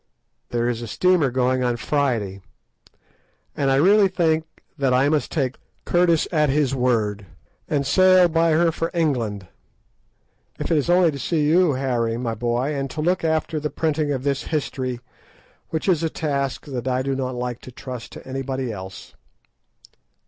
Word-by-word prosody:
There 120 0 0
is 120 -1 -2
a 120 - -5
steamer 180 +2 +2
going 130 0 +1
on 120 -1 0
Friday, 115 -8 -1 1.1
and 140 - 0
I 135 - +3
really 195 +8 +5
think 160 -4 +1 0.3
that 135 -4 +1
I 135 +3 +3
must 155 -1 0
take 130 -5 -1 0.3
Curtis 175 -2 +2
at 150 -4 +2
his 140 -1 +1
word, 110 -6 0 0.4
and 140 -2 0
sail 185 +5 +5
by 165 0 +2
her 165 +1 +3
for 165 +1 -2
England, 120 - -1 1.1
if - - -4
it 165 - +4
is 145 - -3
only 175 -2 +5
to 140 - -7
see 150 +2 0
you, 170 0 +4
Harry, 120 -4 -1
my 120 -2 -2
boy, 120 +5 -1
and 135 -1 -3
to 155 - -7
look 175 +4 +1
after 160 -1 0
the 150 0 -2
printing 155 -2 -1
of 130 -2 -2
this 140 -1 -1
history, 130 -5 -3 0.7
which 160 +3 -3
is 175 -5 +3
a 165 - 0
task 140 -4 -2
that 130 -3 -5
I 130 0 0
do 135 0 -1
not 130 -1 -3
like 125 -1 -4
to 130 - -11
trust 125 -1 -8
to - - -11
anybody 130 -1 -3
else. 95 -2 -9
140 Hz, 170 wpm, -22 LUFS, 125-160 Hz, 1.1 s, really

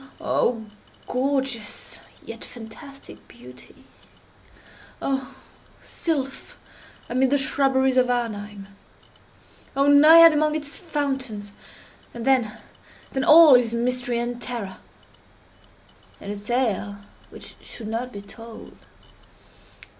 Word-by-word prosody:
Oh, 230 -3 0 0.4
gorgeous 260 -4 -2 0.3
yet - - -8
fantastic 275 +5 -11
beauty! - - -15 1.2
Oh, 270 0 -3 0.4
sylph 275 -5 -4 0.5
amid 255 +2 +1
the 285 - +3
shrubberies 265 -1 +2
of 250 -1 +3
Arnheim! 210 -4 -3 1.1
Oh, 275 0 +2
Naiad 310 +3 +8
among 305 0 +1
its 295 -1 -4
fountains! 270 - -3 0.6
And 235 -1 -6
then—then 265 +1 -2
all 315 0 +8
is 240 -2 +4
mystery 245 0 -1
and 240 0 -3
terror, 215 -6 -5 1.4
and 200 - -7
a 205 - -6
tale 210 -3 -1 0.3
which - - -11
should 225 - -8
not 235 +3 -3
be 200 - -8
told. 225 +3 -11
250 Hz, 95 wpm, -23 LUFS, 225-275 Hz, 1.4 s, Naiad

